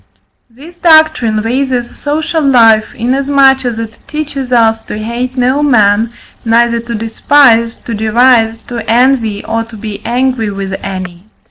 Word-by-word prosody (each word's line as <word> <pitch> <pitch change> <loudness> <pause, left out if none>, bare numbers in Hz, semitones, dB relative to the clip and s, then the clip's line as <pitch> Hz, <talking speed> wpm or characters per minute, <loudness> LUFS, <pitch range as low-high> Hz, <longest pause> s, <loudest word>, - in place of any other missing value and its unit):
This 305 +9 -15
doctrine 315 -10 +3
raises 245 +1 -2
social 315 +3 -2
life, 225 -6 +3
inasmuch 270 +2 +2
as 240 -2 -2
it 225 0 -7
teaches 285 -4 -5
us 225 -2 +2
to 210 - -7
hate 240 +4 -4
no 255 +3 +1
man, 220 -5 +2 0.3
neither 235 +1 +2
to 235 0 -6
despise, 230 +1 +2
to 235 - -5
deride, 225 +1 +1
to 240 -1 -4
envy, 235 -3 +1
or 225 +1 -2
to 225 -1 -13
be 210 -1 -7
angry 245 -2 -1
with 195 -1 -5
any. 185 -2 -7
235 Hz, 140 wpm, -11 LUFS, 225-265 Hz, 0.3 s, doctrine